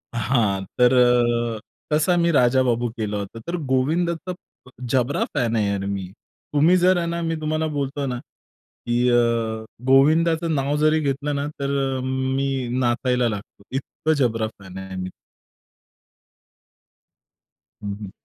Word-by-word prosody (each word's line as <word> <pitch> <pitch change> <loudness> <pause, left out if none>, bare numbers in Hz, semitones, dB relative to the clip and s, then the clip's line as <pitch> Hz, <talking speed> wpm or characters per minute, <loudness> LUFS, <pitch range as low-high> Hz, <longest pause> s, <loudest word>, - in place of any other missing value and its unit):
हां. 110 -5 +1
तर 125 +1 +5
अ, 120 -2 +3 0.3
तसा 160 +4 +3
मी 170 0 +3
राजाबाबू 125 -3 +3
केला 105 -2 -2
होता. 100 +3 -6
तर 170 - -2 0.2
गोविंदाचा 170 +6 0 0.6
जबरा 130 +2 +1
फॅन 115 -1 0
आहे 100 -2 +1
मी. 95 -2 -4 0.4
तुम्ही 155 +5 +5
जर 180 +1 +4
आहे 170 -1 -1
ना, 170 0 -2
मी 165 0 -1
तुम्हाला 155 +1 -1
बोलतो 140 0 -2
ना, 125 -2 -3 0.7
की 120 0 0
अ, 120 - +4 0.7
गोविंदाचं 160 +4 +4
नाव 140 +1 0
जरी 155 +1 +3
घेतलं 140 0 -1
ना, 140 +1 -2
तर 140 0 -1 0.2
अ, - - -3
मी 130 0 -1
नाचायला 125 0 +1
लागतो. 105 -1 -8
इतका 140 +4 -1
जबरा 115 -2 0
फॅन 95 -3 -12
आहे 95 0 -7
मी. 90 0 -4 2.7
हं 100 -1 -3
हं. 100 -2 -7
130 Hz, 135 wpm, -23 LUFS, 115-150 Hz, 2.7 s, तर